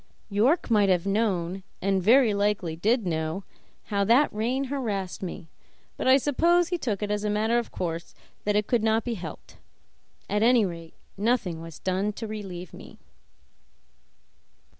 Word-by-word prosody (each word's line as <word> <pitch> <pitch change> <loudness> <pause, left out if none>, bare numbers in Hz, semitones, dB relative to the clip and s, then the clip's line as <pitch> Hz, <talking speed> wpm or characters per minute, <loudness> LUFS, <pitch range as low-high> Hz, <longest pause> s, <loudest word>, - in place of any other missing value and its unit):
York 235 - +2
might 205 -3 +4
have 180 -1 +2
known, 195 -3 0 0.2
and 195 0 +1
very 230 +3 +5
likely 200 -5 0
did 220 +6 +1
know, 160 +2 -2 0.4
how 200 -2 0
that 240 +8 +4
rein 240 +6 -1
harassed 225 -9 -3
me; 175 -3 -6 0.5
but - - -3
I 260 +1 +7
suppose 335 +5 +2
he 355 - 0
took 215 -7 -2
it 205 - -2
as 210 0 -1
a 210 - 0
matter 220 +3 +2
of 235 - -5
course 170 -1 -4 0.3
that 210 0 0
it 210 0 +2
could 240 0 +1
not 220 0 +2
be 240 - -2
helped; 170 -7 -9 0.7
at 210 +1 0
any 235 -1 +5
rate, 165 -3 -7 0.2
nothing 205 -6 0
was 165 -1 -9
done 190 +3 -1
to 225 - -6
relieve 195 -5 -7
me. - - -12
210 Hz, 160 wpm, -26 LUFS, 185-235 Hz, 0.7 s, I